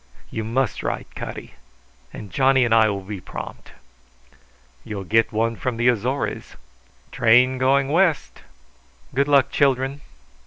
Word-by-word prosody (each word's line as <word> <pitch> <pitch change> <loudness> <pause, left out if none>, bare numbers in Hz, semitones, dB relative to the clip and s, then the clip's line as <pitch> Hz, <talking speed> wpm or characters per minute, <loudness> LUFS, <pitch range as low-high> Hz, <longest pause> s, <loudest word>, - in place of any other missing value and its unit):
"You 110 - -4
must 120 +2 -1
write, - - -4
Cutty, - - -8 0.6
and 100 -3 -10
Johnny 135 -1 +3
and 115 - +1
I 110 -1 +5
will 100 -1 -4
be 100 -1 -7
prompt." - - -9 1.1
"You'll 100 -2 -6
get 110 +4 +2
one 115 +1 0
from 125 +1 -3
the 120 +1 +3
Azores." 125 +4 -2 0.6
"Train 125 +3 +4
going 135 +1 +2
west!" 170 0 +1 0.7
"Good 140 +2 +1
luck, 140 -2 +3
children!" 135 0 +1
125 Hz, 130 wpm, -22 LUFS, 110-135 Hz, 1.1 s, I